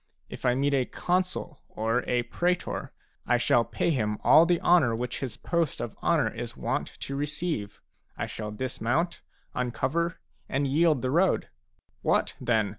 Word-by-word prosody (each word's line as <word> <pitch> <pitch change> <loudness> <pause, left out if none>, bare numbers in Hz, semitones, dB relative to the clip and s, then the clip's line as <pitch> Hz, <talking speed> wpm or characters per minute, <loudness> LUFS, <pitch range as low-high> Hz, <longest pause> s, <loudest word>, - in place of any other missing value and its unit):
If - - -4
I 125 - +3
meet 140 +2 +1
a 130 -2 +2
consul 180 -3 -2
or 115 +3 0
a 120 -1 +2
praetor, 175 +9 -1 0.4
I - - +4
shall 120 - +3
pay 170 - -1
him 105 -7 0
all 165 +2 +7
the 175 -1 +3
honour 160 -10 +4
which 125 +2 -3
his 125 -5 -4
post 170 -3 -1
of 115 - -4
honour - - +2
is - - -6
wont - - -1
to 140 - -4
receive: 145 - -3 0.3
I - - -1
shall 105 -1 -5
dismount, 130 +8 -1 0.3
uncover, 130 +8 -1 0.3
and 140 +1 0
yield 150 0 +3
the 130 - 0
road. 175 +5 +2 0.5
What, - - +1
then? 110 -4 +2
135 Hz, 160 wpm, -28 LUFS, 120-170 Hz, 0.5 s, all